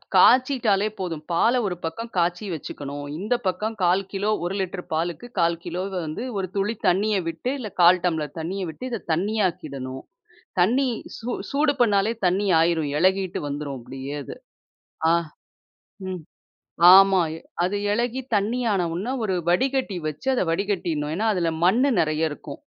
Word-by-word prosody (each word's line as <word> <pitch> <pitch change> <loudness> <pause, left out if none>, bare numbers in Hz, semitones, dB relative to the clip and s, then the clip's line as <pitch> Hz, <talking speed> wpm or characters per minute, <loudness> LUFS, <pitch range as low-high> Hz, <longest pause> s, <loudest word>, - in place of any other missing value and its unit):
காய்ச்சிட்டாலே 245 -6 +5
போதும். 165 -5 -3
பாலை 230 +9 +3
ஒரு 180 - -2
பக்கம் 230 +9 -5
காய்ச்சி 175 +4 +1
வச்சுக்கணும். 145 -1 -6
இந்த 210 +6 0
பக்கம் 210 +5 -1
1/4 180 +2 +4
கிலோ. 200 +1 -1 0.2
1 180 +2 -2
லிட்டர் 185 -1 -4
பாலுக்கு 170 +8 -2
1/4 170 0 +3
கிலோ 175 +2 -3 0.2
வந்து, 155 +9 -4
ஒரு 190 -1 -1
துளி 205 +3 0
தண்ணிய 205 +4 +2
விட்டு 165 +10 -3
இல்ல, 220 -5 -5
கால் 180 +1 +6
டம்ளர் 160 -3 -1
தண்ணிய 185 +4 -3
விட்டு 250 - -9
இதை 230 -4 -3
தண்ணி 200 +7 -1
ஆக்கிடணும். 140 -7 -6 0.6
தண்ணி 250 +9 +3 0.3
சூ 235 - -5 0.2
சூடு 290 +1 +2
பண்ணாலே 210 -2 +3
தண்ணி 190 +3 +1
ஆகிரும். 165 -3 +1
இளகிட்டு 185 +1 +1
வந்துரும் 145 -1 -4
அப்பிடியே 135 +3 -7
அது. - - -8 0.8
ஆ - - +5 0.9
ம் 185 -2 -4 0.7
ஆமா. 195 -1 +6 0.4
அது 195 +3 0
இலகி 240 +4 0
தண்ணி 210 +5 0
ஆன 185 -3 +1
உடனே 195 +9 -3
ஒரு 195 -3 0 0.2
வடிகட்டி 255 +1 +1
வச்சு 155 - -6
அதை 245 - +1
வடிகட்டிடுணும். 165 -5 -1
ஏன்னா 215 +5 -1
அதில 170 -3 0 0.2
மண் 220 +7 +4 0.2
நிறைய 155 0 0
இருக்கும். 145 - -9
185 Hz, 150 wpm, -24 LUFS, 165-215 Hz, 0.9 s, கால்